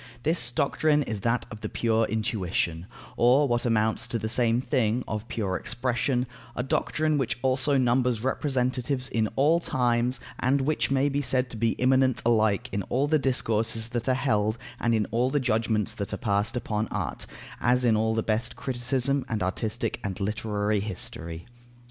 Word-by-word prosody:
This 160 -6 +2
doctrine 150 +4 +1
is 110 -5 -4
that 115 +4 0
of 110 -1 -9
the - - -4
pure 115 -1 +1
intuition 90 -6 -1 0.3
(or, 130 +5 +5
what 120 -1 0
amounts 110 +1 +1
to 115 - -2
the 110 - -3
same 120 0 +2
thing, 125 -1 0
of 110 +1 -4
pure 100 -5 -2
expression); 125 +1 -1 0.3
a 125 - -1
doctrine 155 +3 0
which 125 -4 -1
also 130 +2 +2
numbers 125 -2 +2
representatives 130 -1 0
in 110 -2 0
all 155 +5 +4
times, 125 -4 0 0.2
and 135 +2 +2
which 150 +3 0
may 135 +1 +2
be 145 0 0
said 130 -1 0
to - - -6
be 115 +1 +1
immanent 130 0 +2
alike 110 0 +2
in 100 +1 -1
all 135 +3 +1
the 155 +1 +2
discourses 115 -4 0
that 120 +2 -2
are 130 - +3
held 110 -4 +1 0.2
and 115 -1 +2
in 110 -2 +1
all 120 +3 +2
the 145 +2 +1
judgments 110 -4 0
that 100 - -4
are - - -3
passed 105 +2 0
upon 110 -2 -2
art, - - -4 0.3
as 125 +1 +2
in 115 -2 +4
all 110 +1 +1
the 110 - 0
best 110 +2 -1
criticism 130 +2 -1
and 110 -4 -1
artistic 105 +4 -2
and 95 -2 -4
literary 105 0 -1
history. 85 -4 -5
120 Hz, 175 wpm, -27 LUFS, 110-130 Hz, 0.3 s, or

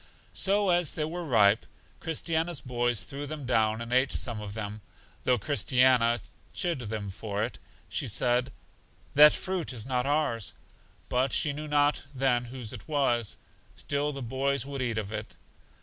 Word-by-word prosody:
So 200 0 +3
as 175 -3 +2
they 155 - -1
were 175 +3 -4
ripe, 110 -7 +4 0.4
Christiana's 165 0 0
boys 120 -3 0
threw 140 +1 -6
them 150 -2 -6
down 110 -2 +1
and 115 +1 -4
ate 130 +2 +3
some 115 -4 -2
of 105 0 -7
them; 105 -1 -5 0.4
though 125 - +4
Christiana 125 -1 +3 0.3
chid 175 -6 0
them 105 -4 -4
for 105 +1 -3
it, 120 - -4 0.4
and 135 - -3
said, 125 +4 +1 0.6
That 150 +1 +9
fruit 185 -5 -2
is 115 -4 -4
not 125 0 -1
ours. 145 -8 0 0.5
But 130 +1 +1
she 150 - +2
knew 150 +2 -6
not 145 0 +2
then 125 -2 +2
whose 120 -1 -5
it 110 - -10
was. 125 -7 +1 0.4
Still 145 +1 -1
the 135 -2 -6
boys 135 +3 0
would 140 -1 -5
eat 120 -3 -1
of 105 -2 -3
it. 110 0 -6
130 Hz, 165 wpm, -28 LUFS, 115-145 Hz, 0.6 s, That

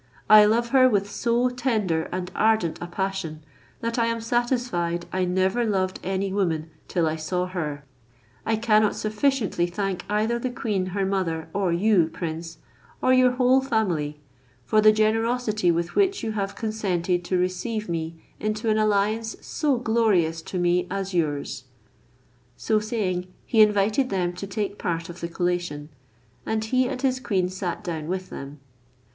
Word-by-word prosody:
I 215 0 +10
love 235 +3 +2
her 255 -1 +6
with 200 -3 +1
so 235 +3 +1
tender 220 -10 -1
and 185 0 -4
ardent 215 -7 +2
a 175 - -4
passion, 175 -4 -3 0.4
that 230 +1 -1
I 230 - +2
am 230 0 -1
satisfied 230 -8 -1
I 185 0 +1
never 190 +6 +1
loved 190 -4 0
any 190 +1 -1
woman 165 -5 -1 0.2
till 175 -3 +1
I 155 0 -1
saw 180 +3 -1
her. 155 -6 -4 0.6
I 225 - +1
cannot 215 -1 +3
sufficiently 215 -4 0
thank 185 0 -3
either 215 +3 +1
the 255 - -2
queen 210 -6 -2
her 195 +1 -1
mother 180 -5 -1
or 195 -3 +1
you, 180 -1 +3
prince, 165 0 -6 0.4
or 255 - +3
your 255 -1 +5
whole 255 +1 +4
family, 180 - -1 0.5
for 215 - +3
the 215 0 +7
generosity 215 -1 +1
with 170 0 0
which 395 -1 +2
you 225 - -1
have 200 -2 -3
consented 185 -5 -1
to 185 - 0
receive 210 +5 -2
me 165 -1 -3 0.2
into 215 +1 -1
an 215 - +2
alliance 215 +2 +1
so 290 -5 0
glorious 215 -9 +2
to 185 - -6
me 175 0 +2
as 195 -1 -3
yours." 145 -5 -1 0.9
So 215 -1 +1
saying 200 -5 -2 0.2
he 225 - +4
invited 210 +5 +3
them 180 -2 -1
to 200 +3 -6
take 200 +1 -3
part 170 -1 -2
of 175 +1 -9
the 170 - -2
collation, 175 -4 -2 0.5
and 220 - -1
he 255 +3 +2
and - - -4
his 260 -1 +1
queen 190 -7 0
sat 185 -2 -4
down 160 -3 -4
with 185 +1 -4
them. 140 +1 -8
195 Hz, 165 wpm, -25 LUFS, 175-225 Hz, 0.9 s, I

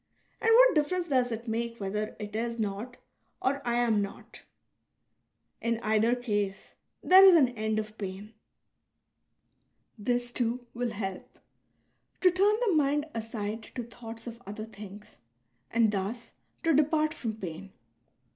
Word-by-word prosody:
And 455 - +2
what - - +7
difference 345 +3 0
does 255 -3 +2
it 230 +1 -5
make 230 +1 -2
whether 210 +2 -3
it 210 0 -7
is 230 +1 -2
not 215 +3 -4 0.4
or 275 +2 0
I 240 -1 0
am 235 -3 +2
not? 200 0 -8 1.2
In 230 -1 0
either 220 +2 +3
case 205 -5 -3 0.3
there 375 +1 +8
is 380 -2 +9
an 275 -7 +5
end 220 -2 -2
of 215 0 -4
pain. 200 +2 -6 1.7
This, 245 +3 -1
too, 240 0 -1
will 245 0 -2
help 195 -4 -6 0.4
— - - -45
to 365 - +6
turn 395 +4 +3
the 405 - +2
mind 295 -1 +2
aside 220 -1 -4
to 245 - -3
thoughts 230 -1 -10
of 235 0 -8
other 210 +2 -6
things 210 -1 -11 0.5
and 225 -2 +3
thus 210 +4 -4 0.3
to 330 - +3
depart 305 +1 +2
from 225 -7 -4
pain. 190 0 -7
230 Hz, 145 wpm, -29 LUFS, 210-255 Hz, 1.7 s, is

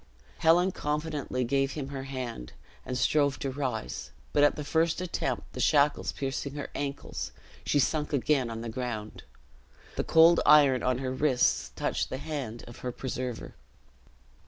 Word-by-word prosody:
Helen 175 +3 +4
confidently 150 -5 -2
gave 135 +2 +1
him 140 -3 -5
her 135 -1 -5
hand, 125 - -6 0.3
and 125 - -2
strove 140 +2 +2
to 135 - -3
rise; 130 -5 -4 0.2
but 145 - +4
at 145 - +5
the 150 - -4
first 160 +3 +1
attempt, 180 -2 -3
the - - -7
shackles 145 -1 +3
piercing 135 +1 -4
her 145 - -5
ankles, 140 -1 -4 0.4
she - - +2
sunk 150 +3 +1
again 140 -2 +1
on 115 0 -5
the 115 - -5
ground. 110 -3 -5 0.8
The - - +1
cold 165 +1 +6
iron 140 -4 +6
on 125 -1 +1
her 130 0 -3
wrists 130 -3 +2
touched - - -1
the 130 - -3
hand 135 -6 -5
of 120 +1 -12
her 125 - -3
preserver. 125 -1 -5
135 Hz, 155 wpm, -29 LUFS, 125-150 Hz, 0.8 s, cold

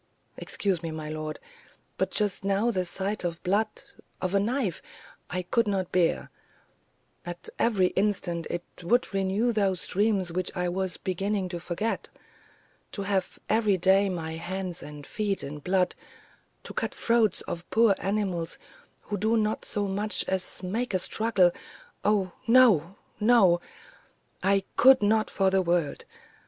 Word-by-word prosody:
"Excuse 190 -5 -2
me, 165 - -4
my 155 -1 -5
lord; 155 0 -5 0.6
but - - 0
just 205 -3 0
now 200 +4 +2
the 185 -4 -1
sight 195 +4 -3
of 170 -1 -3
blood 210 +4 0 0.4
of 185 0 -2
a 200 - +4
knife 220 - -1 0.5
I 180 0 -2
could 230 +5 +1
not 190 -3 -1
bear; 175 -2 +1 0.9
at 175 0 -6
every 195 -6 +3
instant 190 -4 -1
it 175 - -3 0.2
would 230 +6 +1
renew 195 +5 +1
those 195 -5 0
dreams 200 -3 +1
which 185 +1 -1
I 180 0 0
was 185 0 -2
beginning 195 +1 -2
to 175 -1 -4
forget. 180 +6 -3 0.8
To 200 - -3
have 195 -2 -1
every 215 -3 +3
day 195 +3 +4
my 165 -3 -4
hands 180 +1 -4
and 145 -1 -9
feet 205 +2 -2
in 150 +2 -6
blood, 180 +3 +1 0.7
to - - -8
cut - - -2
the - - -16
throats 230 -4 +2
of 170 +1 -6
poor 225 -2 +5
animals 190 -4 -1 0.4
who 205 - -4
do 220 +3 +2
not 215 0 0
so 205 -1 -1
much 205 +2 0
as 190 0 -2
make 215 +4 -2
a - - +5
struggle 190 -1 +2 0.5
oh, 200 -3 +2 0.2
no, 215 -8 +5 0.2
no! 210 -6 +5 0.8
I 195 0 +3
could 260 -3 +7
not 215 +1 +3
for 195 -1 +2
the 190 0 +3
world. 170 -4 0
190 Hz, 150 wpm, -27 LUFS, 175-210 Hz, 0.9 s, could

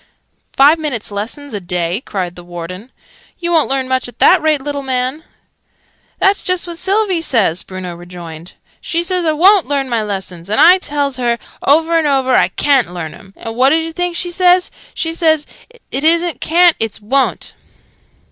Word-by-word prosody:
"Five 295 +4 +5
minutes' 260 -10 -4
lessons 230 +8 -6
a 205 - -2
day!" 175 +2 -2
said 180 -3 -3
the 175 - -11
Warden. 175 +6 -8 0.5
"You 345 -1 -2
won't 325 -3 +2
learn 265 -1 0
much 260 -1 -1
at 245 - -13
that - - +5
rate, 310 -2 +2
little 285 +1 -4
man!" 260 +3 -2 0.9
"That's 390 +1 +2
just 365 -1 -1
what 340 -1 -8
Sylvie 390 -3 0
says," 215 - +1
Bruno 185 -2 -7
rejoined. 175 -1 -10 0.3
"She 335 +1 -1
says 360 -1 -1
I 315 - +2
wo'n't 375 +4 +4
learn 275 -2 -1
my 235 -2 0
lessons. 190 -4 -6
And 215 - 0
I 360 +3 +7
tells 285 -5 -2
her, 240 -2 0 0.2
over 325 +4 +3
and 310 - 0
over, 265 -2 +1
I - - +4
ca'n't 270 -10 +1
learn 170 -3 -6
'em. 195 0 -16
And 225 0 -7
what 255 +3 +4
doos 320 +2 +1
oo 325 - -7
think 355 0 -2
she 350 +1 -2
says? 360 0 +3 0.2
She 325 0 -2
says 315 -3 +1 0.5
'It 275 - -2
isn't 335 +1 +2
ca'n't, 345 +1 +4
it's 225 -1 -1
wo'n't!'" 260 +6 -1
275 Hz, 185 wpm, -16 LUFS, 205-330 Hz, 0.9 s, I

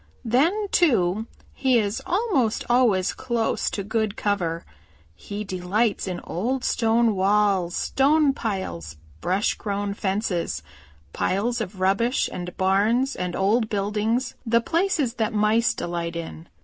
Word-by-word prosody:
Then, 320 - +2
too, 220 - +2 0.3
he 260 -2 +2
is 210 -2 -1
almost 350 - +1
always 230 -7 +3
close 235 -3 -1
to 200 - -4
good 215 0 -1
cover. 175 -5 -1 0.5
He 205 - -6
delights 195 +3 -1
in 180 -2 -4
old 245 +9 -2
stone 230 -1 +2
walls, 195 -2 +2
stone 285 +1 +3
piles, 85 - -4 0.2
brush 190 - +1
grown 200 -1 -3
fences, 190 - -2 0.5
piles 230 +5 0
of 195 -2 -6
rubbish 200 +7 +2
and 180 0 -6
barns 215 +8 +2
and 180 -1 -3
old 215 +4 +2
buildings, 215 +5 -1
the 230 -1 +3
places 330 - 0
that 220 +1 0
Mice 215 +3 +3
delight 170 -1 -3
in. 165 0 -7
210 Hz, 125 wpm, -24 LUFS, 190-240 Hz, 0.5 s, always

